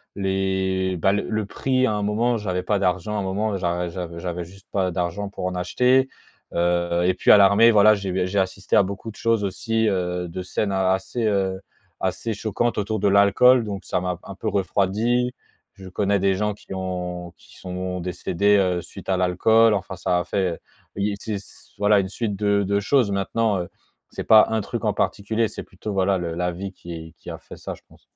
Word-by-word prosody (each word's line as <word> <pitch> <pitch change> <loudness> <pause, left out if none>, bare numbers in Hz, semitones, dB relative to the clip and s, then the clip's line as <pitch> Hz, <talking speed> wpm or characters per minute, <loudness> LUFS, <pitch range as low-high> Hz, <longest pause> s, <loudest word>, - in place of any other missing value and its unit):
les 95 -1 0
bah, 95 - +3
le 105 - 0
le 110 -1 -1
prix 130 +5 0
à 110 - +1
un 105 - -1
moment, 115 +4 +1
j'avais 90 -4 -2
pas 105 0 0
d'argent, 95 +2 0
à - - 0
un - - -2
moment, 100 +2 -1
j'a 90 -1 -1
j'avais 85 -1 -6
j'avais 90 0 -4
juste 95 +2 -16
pas 95 -2 +1
d'argent 90 +4 -2
pour 100 - -6
en 90 - -1
acheter. 125 +9 +2 0.4
Heu, 85 0 +1
et 95 - +3
puis - - -1
à - - +9
l'armée. 100 +3 +6
Voilà, 110 0 +6
j'ai 95 -2 -2
j'ai 95 +2 0
assisté 95 0 -1
à 105 - +6
beaucoup 100 +3 -6
de - - -18
choses 115 -2 +1
aussi 110 +3 0
heu, 90 -2 -1
de 90 +2 -6
scènes 100 +3 -2
assez, 95 +5 0
heu, 95 -2 0 0.4
assez 115 - -2
choquantes 110 +3 -1
autour 110 +1 -2
de 100 - +2
l'alcool, 100 +6 +5
donc 100 -2 -6
ça 90 - -1
m'a, 90 -1 -2
un 100 - -9
peu 110 - -5
refroidi. 105 +5 +1 0.4
Je 95 -1 -11
connais 100 +2 +1
des 100 0 +2
gens, 105 +2 -1
qui 100 - -11
ont 90 -2 -4
qui - - -19
sont 90 0 -5
décédés, 90 +3 +1
heu, 90 -3 +1
suite - - -11
à 95 - +2
l'alcool. 110 +5 +4
Enfin, 95 -1 -4
ça 90 0 0
a - - -1
fait 90 0 -1
heu, - - -8 0.4
il 100 +1 0
y - - -2
a - - -3
c'est 110 - -4
s 100 0 -12
voilà 105 0 +4
une 95 -1 -2
suite 105 +1 -3
de 100 0 +1
de 100 +1 +1
choses, 115 +1 +2
maintenant, 100 +2 0
heu, 85 - -7 0.4
c'est - - -6
pas 110 -1 +7
1 110 -1 0
truc - - -5
en - - +2
particulier, 110 +3 0
c'est - - -7
plutôt, 100 +3 -7
voilà, 95 0 +2
le 85 -2 -3
la 90 +1 -1
vie 95 +3 -6
qui 85 -3 -9
qui - - -10
a - - -6
fait - - -13
ça - - -6
je - - -21
pense. - - -21
95 Hz, 220 wpm, -23 LUFS, 90-105 Hz, 0.4 s, à